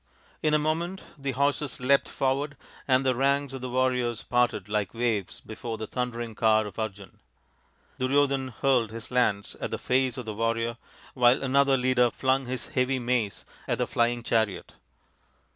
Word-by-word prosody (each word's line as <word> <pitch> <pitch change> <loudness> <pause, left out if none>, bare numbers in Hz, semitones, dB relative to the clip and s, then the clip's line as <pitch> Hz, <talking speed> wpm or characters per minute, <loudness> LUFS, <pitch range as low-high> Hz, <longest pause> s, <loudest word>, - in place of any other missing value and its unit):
In 155 -1 +3
a - - +6
moment 165 +5 -2
the 140 -2 -3
horses 140 +1 0
leapt 135 +2 +3
forward, 140 +2 -1 0.3
and 130 0 +3
the 130 - +3
ranks 140 +2 +1
of 135 - -6
the 130 - -4
warriors 125 -2 0
parted 120 -5 +1
like 105 0 -2
waves 115 -5 -1
before 110 +1 -6
the 110 - -4
thundering 120 -1 -3
car 110 0 +3
of 105 -1 -8
Arjun. 100 -3 -6 0.8
Duryodhan 135 0 +2
hurled 125 -2 +1
his 115 +3 -8
lance 105 -6 +1
at - - -2
the - - -3
face 130 -1 +1
of 125 - -5
the 110 - -4
warrior, 115 +1 -1 0.4
while 125 +1 +4
another 135 +1 +3
leader 125 -1 +3
flung 130 +2 0
his 130 0 -4
heavy 130 +1 +1
mace 120 -6 -1 0.2
at - - 0
the - - +1
flying 120 0 0
chariot. 110 -4 0
125 Hz, 165 wpm, -27 LUFS, 115-135 Hz, 0.8 s, a